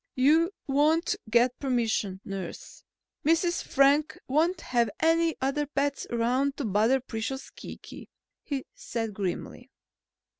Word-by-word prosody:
"You 310 +6 +4 0.2
won't 305 +4 +2
get 240 +2 +3
permission, 225 -7 0
nurse. 195 -3 -7 0.4
Mrs. 335 +3 +2
Frank 285 +2 +3
won't 325 +6 +1
have 235 -3 +1
any 330 0 +3
other 275 +2 0
pets 280 0 -1
around 250 +4 +1
to 285 - -2
bother 220 +6 +3
precious 245 +2 -5
Kiki," - - -10 0.3
he 275 -3 -3
said 235 - -4
grimly. 200 +6 -4
270 Hz, 115 wpm, -28 LUFS, 235-305 Hz, 0.4 s, You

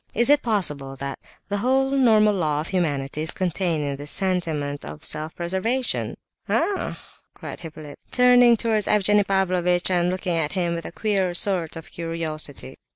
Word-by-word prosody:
Is 235 +5 +4
it 290 0 +5
possible 150 - -1
that 140 +1 -6 0.3
the 205 - -2
whole 265 +4 +1
normal 220 -6 +4
law 155 -6 0
of 160 - -7
humanity 150 -6 -1
is 160 - -2
contained 175 -3 -1
in 140 -1 -3
this 145 +1 -6
sentiment 160 -7 -1
of 155 - -9
self 155 +1 -1
preservation?" 190 +9 -2 0.3
"Ah!" 405 - -1 0.4
cried - - -8
Hippolyte, 155 -3 -10
turning 245 -1 +5
towards 220 -2 0
Evgenie 210 0 +4
Pavlovitch, 180 -2 +1
and 175 -1 +2
looking 180 -1 -2
at 155 -2 -1
him 175 -3 0
with 170 0 -5
a - - -8
queer 190 -2 -1
sort 175 -4 +3
of 165 -1 -10
curiosity. 160 -5 -4
180 Hz, 160 wpm, -23 LUFS, 155-210 Hz, 0.4 s, it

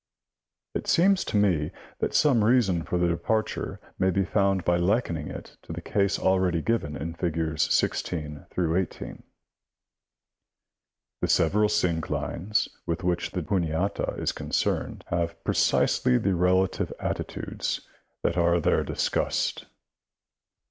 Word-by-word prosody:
It - - -4
seems 190 +2 +4
to 105 - -1
me 90 -8 +2 0.3
that - - -1
some 130 -8 +4
reason 105 -7 +3
for 90 - -2
the 85 0 +2
departure 110 +6 -1 0.2
may 95 - +3
be 95 +1 +1
found 95 -2 +1
by 90 0 +3
likening 85 -4 0
it - - -9
to - - -8
the 85 - -5
case 100 +3 0
already 95 -2 +2
given 80 -6 -1
in 80 +4 -4
figs. 80 -3 -1
16 75 -4 -1
18. 90 +1 -1 2.0
The - - +1
several 105 +5 +3
synclines 90 +4 0 0.2
with 85 +2 -2
which 90 -1 0
the 90 - -3
Juniata 90 +1 -1
is - - 0
concerned - - -2
have 85 -1 -1
precisely 60 - +2
the 100 +7 +1
relative 90 +2 +2
attitudes - - -3 0.4
that 85 - 0
are 85 0 +3
there - - +2
discussed. - - -1
90 Hz, 125 wpm, -26 LUFS, 85-100 Hz, 2.0 s, seems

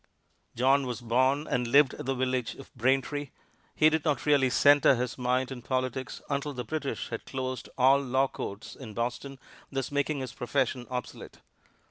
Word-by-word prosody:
John 135 +3 +3
was 125 -1 -4
born 130 +5 +1
and 125 -4 -1
lived 140 +2 +5
at - - -8
the 135 - 0
village 130 -1 -1
of 135 - -13
Braintree. 135 +3 0 0.5
He 155 - +5
did 160 -1 0
not 150 -3 0
really 140 -3 +4
center 145 +1 +5
his 125 -1 -2
mind 125 +1 0
on 125 -2 -6
politics 130 +1 -3
until 140 +1 -2
the 125 -2 -4
British 140 +4 -4
had - - -5
closed 130 -2 -4
all 135 +2 +5
law 135 0 +1
courts 100 -5 -7
in 110 -6 -10
Boston, 125 +4 -3 0.3
thus 135 -1 -3
making 145 0 0
his 130 -3 -6
profession 125 0 -1
obsolete. 125 -2 -6
130 Hz, 170 wpm, -28 LUFS, 125-140 Hz, 0.5 s, lived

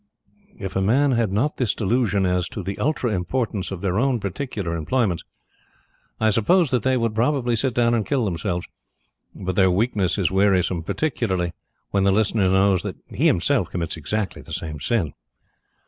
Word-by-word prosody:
If 95 -2 -6
men 120 +9 +3
had 115 -5 +1
not 125 +10 0
this 120 -6 0
delusion 105 -2 +1
as 90 -1 0
to 105 - -6
the 95 +2 -5
ultra 130 -5 0
importance 100 +1 -2
of 95 -3 -6
their 95 +1 0
own 130 -1 +1
particular 100 -3 -3
employments, 90 +2 0 1.0
I 110 - +3
suppose 155 - +3
that 125 -3 +2
they 130 +3 +2
would 115 -2 -1 0.4
sit 130 -1 -1
down 120 -1 +3
and 115 -2 +1
kill 130 0 0
themselves. 90 -1 -2 0.7
But 95 -1 -4
their 95 -1 +5
weakness 95 -2 +1
is 95 -3 +1
wearisome, 95 -3 +2
particularly 95 - -1 0.4
when 100 -1 +2
the 100 - +4
listener 105 -1 +2
knows 95 -1 +3
that - - -5
he - - +1
himself - - +2
commits 85 -2 -3
exactly 100 +6 -3
the - - -10
same 75 -2 -4
sin. 90 -1 0
100 Hz, 165 wpm, -23 LUFS, 90-120 Hz, 1.0 s, their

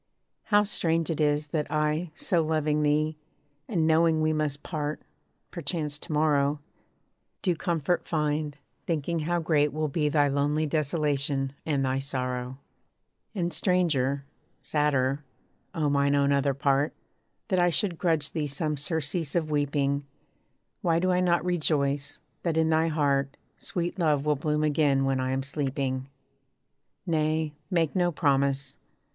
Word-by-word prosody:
How 210 -1 +4
strange 165 -5 0
it 155 - -2
is, 150 0 +1
that 150 0 -2
I, 155 +3 0
so 175 -3 +1
loving 155 -1 +1
thee, 150 +1 +1 0.5
And 170 -7 +1
knowing 160 0 +4
we 155 0 +2
must 150 -2 -2
part, 150 -2 -3 0.5
perchance 150 -3 -3
to - - -9
morrow, 150 -1 +2 0.8
Do 180 -4 +2
comfort 170 +1 -1
find, 150 -2 -1 0.3
thinking 165 0 -1
how 170 +3 0
great 150 -3 +2
will 155 0 -1
be 150 +1 0
Thy 145 -1 +3
lonely 145 +2 +1
desolation, 145 -3 0
and 140 -3 +1
thy 130 +1 0
sorrow. 130 -2 -3 0.8
And 175 -3 -1
stranger 150 -6 +1 0.3
sadder, 145 -2 +1 0.5
O 155 -3 +1
mine 140 0 +2
own 140 0 +3
other 140 -1 +2
part, 140 +1 +1 0.6
That 185 - +2
I 175 0 +4
should 175 0 0
grudge 160 -5 +1
thee 155 -3 -2
some 150 +2 -2
surcease 160 +1 0
of 160 -3 0
weeping; 145 -1 0 0.8
Why 165 -2 +2
do 185 +2 +2
I 180 - +2
not 175 -1 +2
rejoice, 145 -5 0 0.2
that 165 -2 -1
in 160 0 +3
thy 160 +1 +3
heart, 140 -3 0 0.2
Sweet 175 +1 -1
love 150 -4 +2
will 150 0 +3
bloom 150 +2 0
again 145 -3 +2
when 135 -1 +1
I 130 0 -1
am 135 +1 -1
sleeping? 135 -2 -2 1.0
Nay, 155 -2 0 0.2
make 165 -2 +1
no 175 -1 +2
promise. 140 -3 +1
150 Hz, 145 wpm, -27 LUFS, 140-165 Hz, 1.0 s, How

